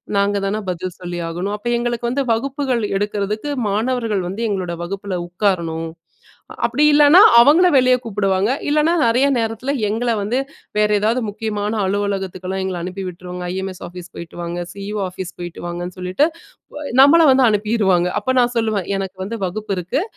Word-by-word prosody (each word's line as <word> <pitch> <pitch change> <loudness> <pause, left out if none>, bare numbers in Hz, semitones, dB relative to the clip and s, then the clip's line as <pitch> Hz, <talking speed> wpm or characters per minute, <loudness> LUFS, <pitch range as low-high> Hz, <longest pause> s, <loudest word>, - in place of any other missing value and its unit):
நாங்கதான 200 +1 0
பதில் 180 0 -4
சொல்லி 175 -1 -5
ஆகணும். 180 +5 -3
அப்ப 210 - -8
எங்களுக்கு 240 0 -2
வந்து, 270 +3 0
வகுப்புகள் 260 0 -1
எடுக்குறதுக்கு 210 +5 -2 0.2
மாணவர்கள் 225 -1 0
வந்து 195 +5 -5
எங்களோட 185 -4 -2
வகுப்புல 195 +2 -4
உட்காரணும். 170 -3 -1 0.8
அப்டி 300 - +1
இல்லனா, 295 +4 +7 0.2
அவங்கள 300 +9 +6
வெளிய 255 -1 +5
கூப்டுவாங்க, 200 -2 0 0.2
இல்லனா 305 +3 +3
நெறைய 240 +4 +3
நேரத்துல 225 +4 -2 0.2
எங்கள 230 +3 -1
வந்து 225 +6 -1 0.4
வேற 210 0 +4
எதாவது 225 +4 +1
முக்கியமான 210 0 -3
அலுவலகத்துக்கெல்லாம் 190 -1 -2
எங்கள 185 -2 -3
அனுப்பி 185 +2 -5
விட்ருவாங்க, 180 0 -7
ம் - - -3
இ.எம்.ஐ.எஸ் 190 -1 -5
ஆபிஸ் 180 0 -11
போயிட்டு 170 -1 -9
வாங்க, 170 +1 -4
சி.ஈ.ஓ 205 +1 -5
ஆபிஸ் 180 0 -7
போயிட்டு 175 -1 -7
வாங்கன்னு 175 +1 -5
சொல்லிட்டு, 185 +10 +1 0.8
நம்மள 325 +5 +7
வந்து 260 0 +4
அனுப்பிருவாங்க. 205 -4 +2
அப்ப 260 - -1
நான் 245 0 +1
சொல்லுவேன், 215 -5 -1
எனக்கு 190 -1 -5
வந்து 225 +4 -5
வகுப்பு 205 +3 -4
இருக்கு, 185 - -1
205 Hz, 150 wpm, -19 LUFS, 185-235 Hz, 0.8 s, இல்லனா